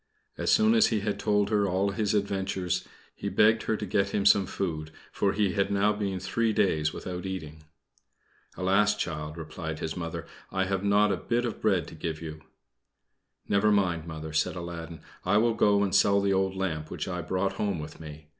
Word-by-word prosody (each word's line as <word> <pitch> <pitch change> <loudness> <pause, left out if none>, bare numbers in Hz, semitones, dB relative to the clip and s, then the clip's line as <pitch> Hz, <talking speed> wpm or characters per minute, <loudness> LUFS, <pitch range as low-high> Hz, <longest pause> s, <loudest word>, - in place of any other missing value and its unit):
As - - 0
soon 220 +1 +5
as 225 -1 +5
he 110 -3 0
had 105 0 -2
told 105 0 +1
her 105 -2 +3
all 95 +2 +1
his 105 0 0
adventures, 95 -3 -1 0.3
he - - -4
begged 110 +1 +4
her 110 - -1
to 105 - -4
get 100 +1 +1
him 100 - -1
some 100 -2 +5
food, 80 -6 -3 0.2
for 100 -1 +1
he 100 -2 +1
had 100 -1 +1
now 100 +1 +3
been 100 -3 -2
three 110 +4 0
days 80 -7 +2
without 90 +2 -6
eating. 80 -5 -6 0.9
"Alas, 100 +3 +3
child!" 75 -5 -4
replied 80 0 -5
his 80 0 -4
Mother, 85 -2 -5 0.3
"I 95 - +1
have 95 0 -1
not 100 +1 +4
a - - 0
bit 120 +1 -1
of 115 - -4
bread 95 -8 +2
to - - -12
give 80 -1 -4
you." 80 -1 -7 1.1
"Never 105 +1 +3
mind, 90 -5 +1
Mother," 80 -1 -6
said 80 +3 +1
Aladdin, 85 -2 -7 0.2
"I 100 +3 +3
will 115 +2 +3
go 100 -2 +3
and 95 - -1
sell 100 0 +5
the 100 -1 +1
old 95 0 +1
lamp 80 -5 -3
which - - -4
I 90 -1 -3
brought 95 +3 -1
home 100 -2 -1
with 75 0 -8
me. 75 -1 -10
95 Hz, 200 wpm, -28 LUFS, 85-105 Hz, 1.1 s, soon